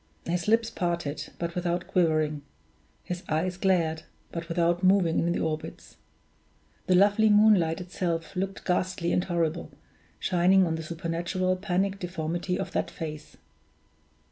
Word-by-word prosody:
His 175 Hz, +1 st, -2 dB
lips 225 Hz, +1 st, +3 dB
parted, 170 Hz, -4 st, -3 dB
but 170 Hz, 0 st, -3 dB
without 175 Hz, 0 st, -1 dB
quivering; 155 Hz, -4 st, +1 dB, 0.6 s
his 180 Hz, 0 st, -5 dB
eyes 170 Hz, +4 st, 0 dB
glared, 175 Hz, -4 st, +1 dB, 0.3 s
but 170 Hz, 0 st, -6 dB
without 170 Hz, +1 st, +1 dB
moving 185 Hz, -3 st, +4 dB
in 170 Hz, -, +1 dB
the -, -, -1 dB
orbits. 155 Hz, -1 st, -5 dB, 0.9 s
The 185 Hz, -, +4 dB
lovely 205 Hz, +3 st, +5 dB
moonlight 205 Hz, -6 st, +5 dB
itself 175 Hz, -2 st, -3 dB
looked 195 Hz, +1 st, -3 dB
ghastly 180 Hz, -1 st, 0 dB
and 180 Hz, -, +2 dB
horrible, 170 Hz, -2 st, -1 dB, 0.5 s
shining 185 Hz, +1 st, +4 dB
on 165 Hz, -, -1 dB
the 160 Hz, -, -3 dB
supernatural 170 Hz, +3 st, -2 dB
panic 195 Hz, +1 st, -1 dB
deformity 175 Hz, 0 st, -3 dB
of -, -, -4 dB
that -, -, -1 dB
face! 155 Hz, -2 st, -7 dB
175 Hz, 135 wpm, -27 LUFS, 165-185 Hz, 0.9 s, lovely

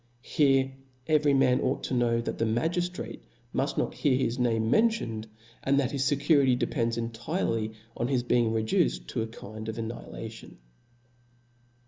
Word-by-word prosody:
Here 135 Hz, -2 st, +3 dB, 0.3 s
every 150 Hz, -2 st, +3 dB
man 130 Hz, -2 st, +4 dB
ought -, -, -1 dB
to -, -, -3 dB
khow 120 Hz, -1 st, +2 dB
that -, -, -3 dB
the 115 Hz, -, +2 dB
magiftrate 175 Hz, +11 st, -1 dB, 0.3 s
mufl -, -, -1 dB
not -, -, 0 dB
hear 130 Hz, -3 st, +2 dB
his 130 Hz, -1 st, -1 dB
name 115 Hz, -2 st, +1 dB
mentioned^ 220 Hz, -, +2 dB, 0.4 s
and 140 Hz, +1 st, +2 dB
that 135 Hz, -2 st, 0 dB
his 140 Hz, 0 st, +1 dB
fecurity 140 Hz, -2 st, +4 dB
depends 115 Hz, -1 st, 0 dB
entirely 115 Hz, -, -2 dB, 0.2 s
on 120 Hz, -, -1 dB
his 130 Hz, -2 st, +1 dB
be 125 Hz, 0 st, +2 dB
ing 115 Hz, -2 st, +2 dB
reduced -, -, +1 dB
to -, -, -2 dB
a 110 Hz, -, -2 dB
kind 110 Hz, 0 st, -8 dB
of 110 Hz, -, -4 dB
annihilaticHi. 115 Hz, 0 st, -7 dB
120 Hz, 155 wpm, -28 LUFS, 115-140 Hz, 0.4 s, man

